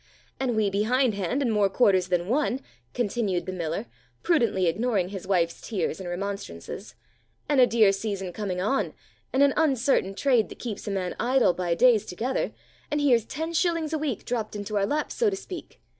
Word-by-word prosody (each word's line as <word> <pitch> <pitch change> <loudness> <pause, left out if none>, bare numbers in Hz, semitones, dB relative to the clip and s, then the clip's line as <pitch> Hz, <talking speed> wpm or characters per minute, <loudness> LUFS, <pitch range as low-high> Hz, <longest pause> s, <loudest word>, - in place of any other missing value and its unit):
"And 255 -3 0
we 210 -2 +2
behindhand 220 +2 +1
in 240 - +1
more 205 -2 +3
quarters 190 -4 +3
than 180 -1 0
one," 265 +2 +1 0.3
continued 210 -5 0
the - - -3
miller, 175 +3 -3 0.4
prudently 235 - +2
ignoring 195 +1 +1
his 190 -2 -7
wife's 170 -4 +1
tears 185 -7 -2
and 185 -2 -5
remonstrances, 195 - -6 0.5
"and 285 -3 +4
a 250 - +7
dear 220 -4 +5
season 195 -2 -3
coming 190 -3 -3
on, 240 +9 0 0.4
and 265 +2 +4
an 280 -1 +4
uncertain 265 -9 +2
trade 245 -2 +2
that - - -10
keeps 220 -3 -6
a - - -1
man 185 -2 -2
idle 250 -4 +3
by 175 -2 -1
days 225 -1 +4
together, 235 +9 -2 0.4
and 295 - 0
here's 245 -6 +3
ten 320 +6 -4
shillings 335 -2 +1
a 315 - 0
week 285 -8 -3
dropped 225 -3 -3
into 205 +1 -4
our 200 -1 +2
laps, 300 +6 -1
so 460 -3 +2
to 395 - -2
speak. 380 -3 -9
215 Hz, 185 wpm, -26 LUFS, 190-265 Hz, 0.5 s, a